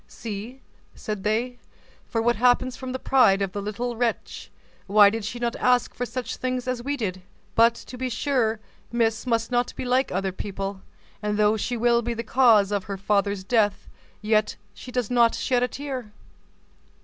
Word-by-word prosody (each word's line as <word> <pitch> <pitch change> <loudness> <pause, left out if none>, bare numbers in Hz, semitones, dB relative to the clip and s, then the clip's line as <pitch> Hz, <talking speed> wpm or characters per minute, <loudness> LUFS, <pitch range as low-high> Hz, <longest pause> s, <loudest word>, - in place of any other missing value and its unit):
"See," 230 +4 -7 0.3
said 210 -3 -5
they, 240 +4 -1 0.5
"what 235 +1 +2
happens 250 +2 +3
from 260 0 -6
the 260 - -2
pride 250 -8 +4
of 195 - -3
the 205 - -4
little 235 +4 -3
wretch; 235 0 -3 0.4
why 205 0 +7
did 225 - -2 0.2
not 235 -1 -1
she - - -8
ask 250 -1 +2
for 245 - -3
such 250 +1 -5
things 255 -1 -3
as 255 -1 -2
we 285 +3 -2
did? 185 -6 -3 0.3
But, 230 +1 +5
to 250 - -10
be 260 0 -1
sure, 230 -3 0 0.3
Miss 230 0 0
must 230 0 0
not 245 0 0
be - - -5
like 255 +2 +1
other 190 +1 -1
people; 195 0 -5 0.4
and 210 -1 -1
though 210 0 +4
she 240 +3 -2
will 235 +1 +3
be 235 0 -3
the 230 - -4
cause 225 -5 +4
of 200 -2 -1
her 200 -1 -5
father's 200 0 0
death, 210 -1 +1 0.4
yet 215 0 +2 0.2
she 250 +5 -10
does 250 -2 -2
not 235 -2 +4
shed 250 -2 0
a 250 - +2
tear." 260 -5 -6
230 Hz, 185 wpm, -25 LUFS, 210-250 Hz, 0.5 s, why